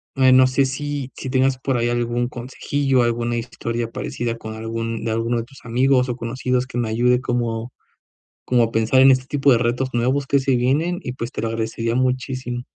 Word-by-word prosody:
eh, 130 -1 +5
no 130 0 +7
sé, 135 +1 +2
si 140 0 -4
si 130 - -6
tengas 130 0 +2
por 130 -1 -1
ahí 120 0 +1
algún 120 0 -1
consejillo, 130 +1 -1
alguna 120 0 0
historia 115 0 -4
parecida 115 -1 -3
con 110 -1 -7
algún 115 0 -4
de 115 - -1
alguno 115 +2 0
de 115 - -2
tus 135 +1 -17
amigos 125 +2 +2
o 120 - -1
conocidos 125 +1 -2
que 120 - -6
me 120 -2 0
ayude 125 +2 +2
como 120 -1 -2 0.7
como 120 -2 +3
a 115 - -1
pensar 115 +4 +3
en 135 - +8
este 130 0 +1
tipo 140 0 +2
de 120 - +5
retos 120 +2 0
nuevos 130 +4 +1
que 140 0 +2
se 135 -1 +1
vienen 150 +9 +1
y - - -4
pues, 125 +1 -6
te - - -4
lo 115 - -1
agradecería 115 +1 -2
muchísimo. 130 -1 -1
125 Hz, 205 wpm, -21 LUFS, 115-130 Hz, 0.7 s, en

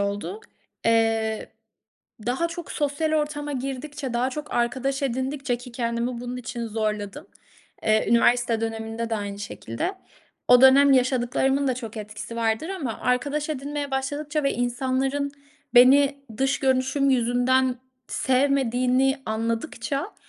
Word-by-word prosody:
oldu. 200 - -3 0.5
Eee, 225 -1 +1 0.7
daha 260 +8 0
çok 335 -1 -7
sosyal 295 +2 -1
ortama 295 -1 -1
girdikçe, 270 0 -4
daha 245 +2 +1
çok 300 +3 -6
arkadaş 260 +3 0
edindikçe 265 0 -1
ki 245 0 -11
kendimi 235 0 -1
bunun 245 +1 -5
için 235 -1 -5
zorladım. 215 - -3 0.6
Eee, 220 0 +3
üniversite 235 -1 +3
döneminde 225 +1 -3
de 225 - 0
aynı 200 -1 -5
şekilde. 205 - -4 0.5
O 250 0 +7
dönem 275 +1 +7
yaşadıklarımın 260 +2 +2
da 255 - +1
çok 225 -3 -7
etkisi 215 +2 -7
vardır 225 +7 0
ama 300 - -4
arkadaş 285 +5 0
edinmeye 285 0 -3
başladıkça 290 +3 -2
ve 275 - +1
insanların 265 +3 -1 0.4
beni 275 +3 +6 0.2
dış 270 0 +1
görünüşüm 265 +1 +2
yüzünden 250 +1 +2 0.3
sevmediğini 260 0 +2
anladıkça 230 - -3
255 Hz, 120 wpm, -25 LUFS, 230-280 Hz, 0.7 s, O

